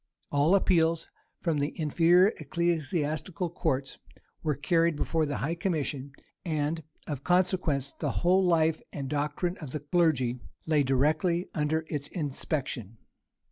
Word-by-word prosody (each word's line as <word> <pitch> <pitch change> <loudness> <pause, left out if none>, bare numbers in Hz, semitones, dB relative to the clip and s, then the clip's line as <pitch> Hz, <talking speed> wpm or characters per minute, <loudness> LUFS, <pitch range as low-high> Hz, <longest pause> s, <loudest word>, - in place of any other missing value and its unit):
All 145 +6 +4
appeals 165 -4 +2 0.3
from 165 -4 0
the 145 +4 -2
inferior 170 +5 +5
ecclesiastical 160 +1 -1
courts 140 -6 -2 0.4
were 150 -3 0
carried 165 +3 +2
before 155 +1 0
the 145 - -2
high 160 +5 -1
commission; 150 -6 -2 0.3
and, 155 -1 -1 0.2
of 140 -3 -5
consequence, 175 -7 +1
the - - -3 0.2
whole 185 +2 +5
life 160 -3 +3
and 140 -2 -5
doctrine 150 +5 -1
of 145 -5 -7
the 155 - -2
clergy 145 -5 +1 0.3
lay 155 -2 +3
directly 155 +7 +1
under 160 +1 0
its 145 -2 -3
inspection. 135 - -4
155 Hz, 130 wpm, -29 LUFS, 145-170 Hz, 0.4 s, inferior